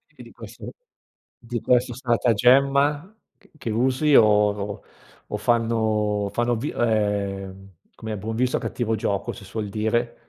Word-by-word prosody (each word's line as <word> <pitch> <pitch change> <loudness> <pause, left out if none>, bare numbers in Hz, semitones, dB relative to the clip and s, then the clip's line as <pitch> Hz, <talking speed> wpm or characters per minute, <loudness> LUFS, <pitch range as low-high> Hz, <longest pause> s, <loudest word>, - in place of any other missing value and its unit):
E - - -12
di - - -14
questo - - -10 0.7
di 120 -1 -5
questo 125 0 +2
stratagemma 135 - +2 0.2
ch 200 - -25
che 120 - -5
usi 130 +6 +1
o 110 - +8
o 105 -1 0 0.4
o 105 - -4
fanno 115 +1 +1 0.5
o - - -3
fanno 120 +2 0
vi 130 +7 -3
ehm, 100 -3 -1 0.3
com'è, 110 -2 -6
buon 110 +3 -5
viso 125 +1 +1
a - - -3
cattivo 115 -2 -2
gioco 100 -2 -2
si 100 - -11
suol 105 +1 -5
dire. 120 +3 -1
115 Hz, 150 wpm, -23 LUFS, 105-125 Hz, 0.7 s, o